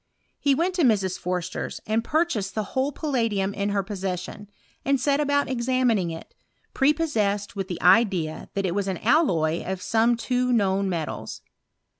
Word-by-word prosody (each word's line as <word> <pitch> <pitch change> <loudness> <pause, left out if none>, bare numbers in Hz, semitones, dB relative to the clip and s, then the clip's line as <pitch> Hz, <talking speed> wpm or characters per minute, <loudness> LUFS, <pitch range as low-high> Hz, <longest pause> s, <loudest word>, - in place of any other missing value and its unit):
He 280 -1 +3
went 345 +6 0
to - - +2
Mrs. 200 - +2
Porster's, 180 0 -3
and 220 +1 0
purchased 270 - 0
the 215 - 0
whole 265 +2 +1
palladium 230 -10 -1
in 200 0 -1
her 200 -1 0
possession, 195 +1 -5 0.3
and 275 -1 +2
set 280 +1 +1
about 285 -1 +1
examining 245 -6 +1
it, 165 0 -8 0.4
prepossessed 225 -10 +1
with 195 -2 -3
the 180 -3 -5
idea 180 -4 +3
that 195 -1 0
it 175 - 0
was 200 0 -1
an 190 -2 -2
alloy 175 - +2
of 190 0 -4
some 225 +5 +2
two 250 +1 0
known 195 -4 +2
metals. 165 -4 -4
210 Hz, 160 wpm, -25 LUFS, 190-260 Hz, 0.4 s, He